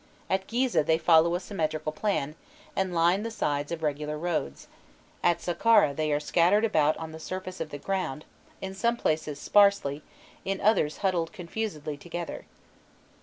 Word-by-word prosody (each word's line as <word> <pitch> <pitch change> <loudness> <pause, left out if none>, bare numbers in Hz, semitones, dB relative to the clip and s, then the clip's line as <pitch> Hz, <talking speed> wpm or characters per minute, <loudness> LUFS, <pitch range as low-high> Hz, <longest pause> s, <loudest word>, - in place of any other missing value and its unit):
At 190 0 0
Gîzeh 245 - +1
they 160 +2 +3
follow 165 +1 +4
a - - 0
symmetrical 155 -5 -2
plan, 155 -4 -1 0.4
and 190 -1 0
line 175 +3 +3
the 230 - -3
sides 145 -9 -2
of 165 -1 -4
regular 150 0 -2
roads; 155 - -3 0.5
at 175 -1 +3
Saqqâra 175 -4 +3
they 155 0 0
are 145 - +2
scattered 175 +8 +3
about 155 -7 +2
on 160 -1 -6
the 160 - -9
surface 185 +2 -6
of 160 - -3
the 145 - -6
ground, 170 -4 -3 0.4
in 190 0 -5
some 235 +5 0
places 155 -6 -1
sparsely, 200 -9 +3 0.4
in 195 0 -2
others 195 -8 +2
huddled 175 -3 +1
confusedly 170 -6 -5
together. 175 +2 -6
170 Hz, 160 wpm, -28 LUFS, 155-195 Hz, 0.5 s, follow